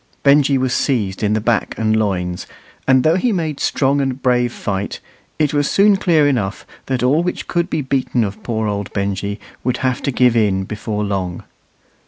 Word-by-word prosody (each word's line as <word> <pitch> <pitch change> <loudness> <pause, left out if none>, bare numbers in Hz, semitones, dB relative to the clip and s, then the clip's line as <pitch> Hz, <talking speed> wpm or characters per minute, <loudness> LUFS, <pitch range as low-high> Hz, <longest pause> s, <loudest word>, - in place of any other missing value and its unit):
Benjy 140 -1 +4
was 130 -1 0
seized 105 -9 0
in 105 -1 +1
the 110 - +1
back 115 -1 0
and 110 -1 +1
loins; 90 -5 -1 0.4
and 130 -1 +5
though 160 +3 +3
he 235 +6 +1
made 160 -7 -2
strong 140 +1 +1
and 135 -1 -2
brave 125 -2 +1
fight, 100 -3 -4 0.4
it 150 -2 +1
was 145 -1 +1
soon 200 +1 +5
clear 165 -6 +3
enough 110 -8 -1 0.2
that 130 -2 -1
all 140 +6 +3
which 180 +1 -3
could 170 0 -1
be 155 - -1
beaten 130 -2 0
of 105 +1 -5
poor 110 -1 -2
old 100 -1 -3
Benjy 100 +1 -2 0.2
would 125 0 0
have 130 -1 0
to - - -1
give 125 -1 +3
in 100 -4 +2
before 105 +1 -4
long. 95 -4 -3
125 Hz, 190 wpm, -18 LUFS, 105-140 Hz, 0.4 s, and